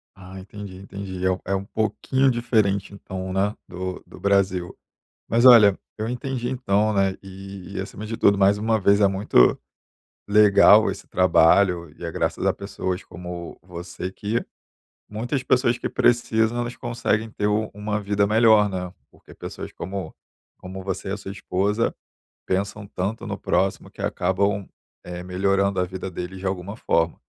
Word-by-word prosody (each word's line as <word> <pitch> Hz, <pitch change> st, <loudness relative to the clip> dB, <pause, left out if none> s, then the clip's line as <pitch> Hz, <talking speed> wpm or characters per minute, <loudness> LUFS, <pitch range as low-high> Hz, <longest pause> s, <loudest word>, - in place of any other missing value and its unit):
Ah, 95 Hz, -1 st, -11 dB
entendi, 100 Hz, 0 st, -9 dB
entendi, 95 Hz, -1 st, -6 dB
é 95 Hz, -, +4 dB
um 90 Hz, -, -2 dB
é 95 Hz, -, 0 dB
um 95 Hz, 0 st, -3 dB
pouquinho 110 Hz, +6 st, 0 dB
diferente 105 Hz, -5 st, 0 dB
então, 95 Hz, -2 st, -6 dB
né, 100 Hz, +3 st, 0 dB
do 95 Hz, +1 st, -6 dB
do -, -, -14 dB
Brasil. 95 Hz, -3 st, +1 dB, 0.5 s
Mas 120 Hz, +2 st, +2 dB
olha, 105 Hz, -6 st, +8 dB, 0.2 s
eu 110 Hz, -, -3 dB
entendi 125 Hz, 0 st, -3 dB
então, 110 Hz, -4 st, +1 dB
né, 95 Hz, -1 st, +1 dB
e 95 Hz, 0 st, -10 dB
e -, -, -3 dB
acima 100 Hz, +2 st, -7 dB
de 115 Hz, +1 st, -4 dB
tudo 100 Hz, 0 st, +4 dB
mais 100 Hz, +1 st, +4 dB
uma 110 Hz, +1 st, +1 dB
vez 100 Hz, +1 st, +4 dB
é 100 Hz, -, +6 dB
muito 95 Hz, -10 st, +3 dB, 0.7 s
legal 105 Hz, -1 st, +6 dB
esse -, -, -9 dB
trabalho 90 Hz, -1 st, +3 dB
e -, -, -11 dB
é -, -, -4 dB
graças -, -, -2 dB
a -, -, +3 dB
pessoas 95 Hz, -2 st, -4 dB
como 90 Hz, 0 st, -8 dB
você 90 Hz, +1 st, -7 dB
que 105 Hz, +4 st, -2 dB, 0.6 s
muitas 120 Hz, +6 st, -3 dB
pessoas 120 Hz, -1 st, +2 dB
que -, -, -4 dB
precisam 115 Hz, -1 st, +2 dB
elas 120 Hz, 0 st, -3 dB
conseguem 115 Hz, -2 st, -1 dB
ter 105 Hz, -1 st, -2 dB
u 105 Hz, +1 st, 0 dB
uma 105 Hz, +1 st, -3 dB
vida 100 Hz, 0 st, +1 dB
melhor, 110 Hz, -1 st, +5 dB
né? 90 Hz, -2 st, -5 dB, 0.2 s
Porque -, -, -17 dB
pessoas -, -, -8 dB
como 95 Hz, +2 st, -6 dB, 0.4 s
como 95 Hz, +1 st, -8 dB
você 95 Hz, 0 st, -4 dB
e -, -, -2 dB
a 100 Hz, -, -2 dB
sua 95 Hz, -1 st, -7 dB
esposa 100 Hz, +3 st, -1 dB, 0.5 s
pensam 100 Hz, +2 st, -2 dB
tanto 100 Hz, +3 st, -4 dB
no -, -, -4 dB
próximo 95 Hz, 0 st, 0 dB
que -, -, -15 dB
acabam, 100 Hz, +2 st, 0 dB, 0.4 s
eh, 90 Hz, 0 st, -6 dB
melhorando 95 Hz, +1 st, +1 dB
a -, -, +2 dB
vida 95 Hz, +1 st, -6 dB
deles 90 Hz, +1 st, -6 dB
de 95 Hz, -, -5 dB
alguma 95 Hz, +2 st, -3 dB
forma. 85 Hz, -6 st, 0 dB
100 Hz, 165 wpm, -23 LUFS, 95-105 Hz, 0.7 s, olha